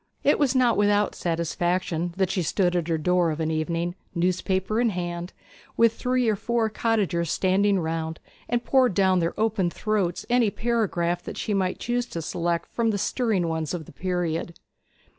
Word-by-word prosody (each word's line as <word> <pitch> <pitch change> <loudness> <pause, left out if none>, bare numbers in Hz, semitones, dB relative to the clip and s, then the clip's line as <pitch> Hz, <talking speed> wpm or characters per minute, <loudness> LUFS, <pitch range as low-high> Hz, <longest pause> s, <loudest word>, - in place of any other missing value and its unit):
It 290 - +3
was 275 -3 +2
not 250 -2 +3
without 205 0 +3
satisfaction 170 0 -1
that 190 -1 +1
she 185 - 0
stood 180 +2 +1
at 170 -2 0
her 165 -1 +1
door 180 +1 +2
of 155 0 -3
an 160 0 0
evening, 165 +2 -1 0.2
newspaper 190 +4 0
in 240 - +3
hand, 175 -2 -4 0.5
with 230 -1 +5
three 250 0 0
or 215 - +3
four 230 +1 0
cottagers 200 -8 0
standing 195 +2 +2
round, 160 -1 -3 0.3
and 240 0 0
poured 255 -7 +3
down 190 -2 +3
their 170 +3 -2
open 215 -5 +1
throats 195 -2 -1
any 240 -3 +3
paragraph 195 -7 0
that - - -8
she 210 - -2
might 185 -2 0
choose 245 +1 -1
to 165 - -5
select 170 +1 -1
from 230 -1 +1
the 210 - 0
stirring 205 -4 0
ones 160 -1 -2
of 160 -3 -6
the - - -13
period. 175 -1 -2
185 Hz, 180 wpm, -25 LUFS, 170-220 Hz, 0.5 s, with